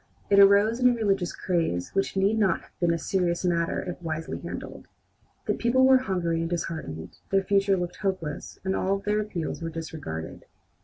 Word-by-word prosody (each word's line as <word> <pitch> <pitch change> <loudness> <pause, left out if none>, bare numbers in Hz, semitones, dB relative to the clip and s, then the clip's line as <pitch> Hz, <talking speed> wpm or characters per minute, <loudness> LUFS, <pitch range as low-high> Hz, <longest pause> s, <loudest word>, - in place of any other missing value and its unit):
It 200 - +6
arose 200 +4 +6
in 250 -1 +6
a 245 - +2
religious 195 -6 0
craze 165 - -1
which 195 0 -1
need 200 +3 +2
not 195 -5 +2
have - - -22
been 175 -1 +2
a 170 - +1
serious 175 0 -1
matter 170 -1 0
if 180 -1 -6
wisely 160 -1 -4
handled. - - -7 0.6
The - - +1
people 260 +2 +3
were 260 0 +6
hungry 175 -8 -1
and 165 - -2
disheartened, 160 - -5
their 195 0 +2
future 195 0 +2
looked 175 0 -4
hopeless, 185 -7 -3
and 190 0 0
all 195 +1 +1
their 210 +2 0
appeals 185 -7 -4
were 165 - -3
disregarded. 155 - -6
185 Hz, 185 wpm, -26 LUFS, 165-200 Hz, 0.6 s, It